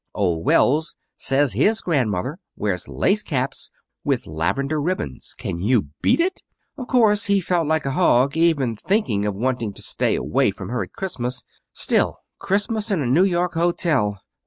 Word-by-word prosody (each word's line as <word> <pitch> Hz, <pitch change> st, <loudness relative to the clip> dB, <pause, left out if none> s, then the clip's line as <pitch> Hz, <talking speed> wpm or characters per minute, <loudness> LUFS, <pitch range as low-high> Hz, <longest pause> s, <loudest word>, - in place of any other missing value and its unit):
Old 85 Hz, -5 st, 0 dB
Wells 155 Hz, +5 st, +3 dB, 0.2 s
says 135 Hz, -1 st, +1 dB
his 220 Hz, +1 st, +2 dB
grandmother 130 Hz, -, -1 dB, 0.2 s
wears 100 Hz, -4 st, -2 dB
lace 210 Hz, +2 st, +1 dB
caps 135 Hz, -6 st, -2 dB, 0.3 s
with -, -, 0 dB
lavender 135 Hz, -, -1 dB
ribbons. 145 Hz, -, -4 dB
Can 85 Hz, -, -4 dB
you 105 Hz, -, +1 dB
beat -, -, +3 dB
it! 370 Hz, +2 st, 0 dB, 0.3 s
Of 255 Hz, -3 st, -7 dB
course 215 Hz, -6 st, +3 dB
he 200 Hz, 0 st, +3 dB
felt 175 Hz, -3 st, 0 dB
like 160 Hz, -1 st, +1 dB
a 135 Hz, -, 0 dB
hog, 135 Hz, -3 st, +3 dB
even 155 Hz, -8 st, +2 dB
thinking 110 Hz, -, 0 dB
of 105 Hz, -, -2 dB
wanting 115 Hz, -1 st, -1 dB
to -, -, -9 dB
stay -, -, 0 dB
away -, -, +1 dB
from -, -, -7 dB
her 125 Hz, +1 st, -1 dB
at -, -, -6 dB
Christmas. 125 Hz, -9 st, -4 dB, 0.3 s
Still, -, -, 0 dB, 0.2 s
Christmas 205 Hz, +3 st, 0 dB
in 185 Hz, -8 st, +1 dB
a -, -, -2 dB
New 145 Hz, +10 st, +4 dB
York 175 Hz, -2 st, 0 dB
hotel 165 Hz, -, +1 dB
145 Hz, 165 wpm, -22 LUFS, 115-185 Hz, 0.3 s, New